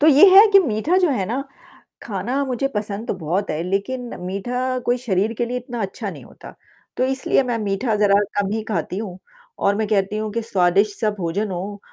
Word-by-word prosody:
तो 300 - +4
ये 300 +3 +8
है 420 - +10
कि 395 - +8
मीठा 285 - 0
जो 365 -2 +3
है 205 -9 0
ना, 245 +7 -2 0.6
खाना 235 +7 -2
मुझे 260 +1 -1
पसंद 210 +1 -3
तो - - 0
बहुत 180 +4 -2
है, 155 +1 -2
लेकिन 235 +7 -2
मीठा 250 +8 -2
कोई 245 +1 +2
शरीर 220 -2 0
के 240 +1 -1
लिए 245 +1 -3
इतना 245 -2 -5
अच्छा 195 -1 -4
नहीं - - -10
होता, - - -13 0.5
तो - - +2
इसलिए 265 +1 +1
मैं 245 -2 -1
मीठा 210 +2 -1
ज़रा 205 -1 +4 0.2
कम 200 -1 -1
ही 220 - -1
खाती 180 -1 -2
हूँ। 200 -4 -5 0.4
और 200 0 +3
मैं 215 +1 -1
कहती 205 0 0
हूँ 215 0 -3
कि 230 - -1
स्वादिष्ट 200 -1 +1
सा 215 - +2
भोजन 190 +3 -2
हो 195 +3 -5
215 Hz, 210 wpm, -21 LUFS, 195-250 Hz, 0.6 s, है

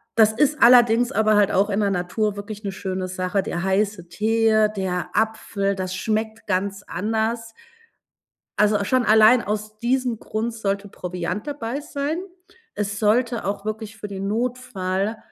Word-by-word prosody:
das 220 -1 +5
ist 295 +5 +1
allerdings 240 0 +6
aber 215 +1 +3
halt 205 -1 +4
auch 200 +2 +2
in 200 0 0
der 200 -2 +1
Natur 195 +3 -1
wirklich 205 +1 -7
'ne 200 - -3
schöne 185 -1 -4
Sache. 185 +1 -1
Der 175 0 -3
heiße 190 -2 0
Tee, 220 +3 +3
der 185 -2 -2
Apfel, 210 -2 0
das 185 -1 -4
schmeckt 220 +2 -2
ganz 195 +1 -1
anders. 225 +4 -2 1.1
Also, 210 -1 +3
schon 255 +4 +2
allein 220 +2 +6
aus 215 0 -4
diesem 245 -1 0
Grund 225 +2 -3
sollte 200 -2 -2
Proviant 180 +2 -5
dabei 280 -2 -3
sein. 290 +1 -3 0.6
Es 205 0 -3
sollte 230 +2 +1
auch 200 +1 -3
wirklich 220 0 -5
für 210 - -6
den 195 -1 -5
Notfall, 215 -3 -2
215 Hz, 155 wpm, -23 LUFS, 195-225 Hz, 1.1 s, allerdings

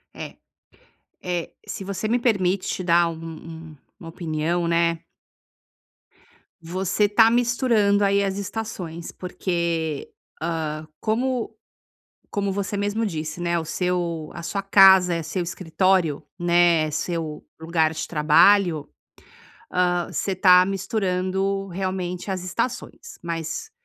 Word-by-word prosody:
É, - - -8 0.9
é, 175 -2 -3 0.2
se 195 - -5
você 200 +2 -3
me 240 +3 +2
permite 195 -5 0
dar 170 0 +4
um 165 - -5 0.6
um 150 - -16 0.2
uma 165 -3 -9
opinião, 165 +1 -2
né. 170 0 +2 1.6
Você 185 +4 0
está 220 +2 +5
misturando 230 -4 +2
aí 200 0 +3
as 195 0 -2
estações, 190 -5 -5
porque, 170 -4 -3 0.3
ah, 155 -2 -3
como 245 +2 -1 0.8
como 200 -1 -1
você 200 +1 -3
mesmo 205 +2 -1
disse, 155 -2 -4
né, 170 0 0
o 160 - -3
seu 170 -2 -2
a 170 - -7
sua 195 +3 -3
casa 190 -3 +6
é 165 - -2
seu 170 +3 -3
escritório, 175 -2 +1 0.2
né, 170 -3 +3
seu 155 0 -3 0.2
lugar 160 -1 +1
de - - -4
trabalho, 160 +1 +4 0.9
ah, 175 -1 +1
você 195 - -1
está 180 -1 +6
misturando 195 0 -1
realmente 185 0 -4
as 185 -2 -3
estações, 235 - -4
mas 170 - -4
180 Hz, 120 wpm, -23 LUFS, 165-200 Hz, 1.6 s, casa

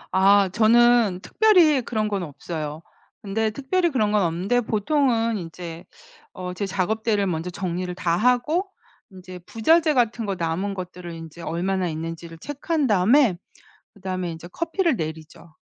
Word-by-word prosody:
아 195 +1 +5
저는 225 -1 +4
특별히 355 -11 +4
그런 220 -2 -2
건 200 -2 -2
없어요. 155 -1 -6 0.4
근데 215 +2 0
특별히 310 +10 0
그런 215 -8 +1
건 210 -1 +3
없는데 185 +8 0
보통은 230 0 +1
인제 165 -1 -8 0.5
어 180 -1 -6
제 200 +3 -3
작업대를 205 +2 0
먼저 170 -1 -2
정리를 180 0 -4
다 170 -2 0
하고 250 - +1 0.4
인제 185 -1 -11
부자재 315 +8 +3
같은 235 -2 +1
거 195 - -1
남은 175 +4 -2
것들을 180 -1 -7
인제 165 0 -10
얼마나 185 +2 -1
있는지를 165 +1 -6
체크한 290 - -2
다음에 215 +1 +4 0.6
그다음에 185 -2 -4
인제 165 +1 -10
커피를 335 - 0
내리죠. 160 0 -7
195 Hz, 315 characters per minute, -23 LUFS, 175-240 Hz, 0.6 s, 아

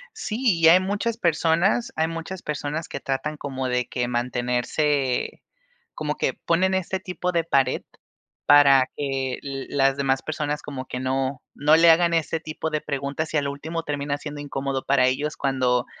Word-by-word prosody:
Sí, 215 - -4 0.2
y 165 - +6
hay 170 +3 +8
muchas 205 +4 -2
personas 175 - +2
hay 160 0 +1
muchas 165 +3 -6
personas, 150 +1 -3
que - - -6
tratan 135 +3 -3
como, 135 -3 -4
de 125 -1 0
que 125 -1 -2
mantenerse, 125 +3 -1 0.5
como - - -2
que - - 0
ponen 185 +3 +1
este 190 0 -2
tipo 180 -1 -3
de 170 -2 +1
pared, 135 -5 +1 0.6
para 140 -3 +6
que 135 -2 -2
la 135 0 0
las 135 0 -1
demás 135 -1 +1
personas, 150 -1 -3
como 135 -2 -6
que 125 - -5
no 130 +1 -1
no 150 +2 +4
le 170 0 +6
hagan 170 +1 +5
ese 165 0 0
tipo 160 0 -4
de 155 -1 -2
preguntas, 140 +2 -3
y - - +2
a - - +2
lo 140 0 -2
último 160 +4 -5
termina 145 -1 -2
siendo 150 -1 -7
incómodo 135 -2 -3
para 130 -1 +4
ellos 145 +5 -1
cuando 130 -3 +1
145 Hz, 175 wpm, -24 LUFS, 135-165 Hz, 0.6 s, hay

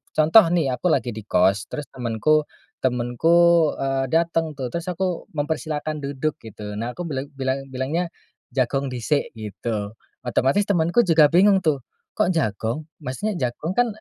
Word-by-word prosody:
contoh 160 +8 +7
nih 155 -6 +1
aku 125 +7 -1
lagi 130 -7 +1
di 110 -1 -9
kos 95 +1 +2
terus 150 - -5
temenku 130 +6 +1 0.3
temenku, 160 +7 +3
eee, 135 -1 0
dateng 165 -1 +1
tuh 130 -3 -4
terus 170 +7 -4
aku 180 -1 -2
mempersilahkan 155 0 -2
duduk 145 +1 -3
gitu, 105 -2 -8
nah 115 +3 -3
aku 180 - -7
bilang 135 -2 -3
bilang 135 0 -2
bilangnya, 140 +7 -1 0.5
"Jagong 135 +1 0
disik," 125 +4 -1
gitu, 110 0 -5 0.2
otomatis 135 +10 +2
temanku 175 +3 +3
juga 165 -7 +5
bingung 190 +6 +5
tuh, 145 -4 +2 0.3
"Kok - - +1
jagong? 125 - -1 0.2
Maksudnya 170 +11 -3 0.2
jagong 155 +8 -5
kan 245 +4 +3
145 Hz, 150 wpm, -23 LUFS, 125-165 Hz, 0.5 s, contoh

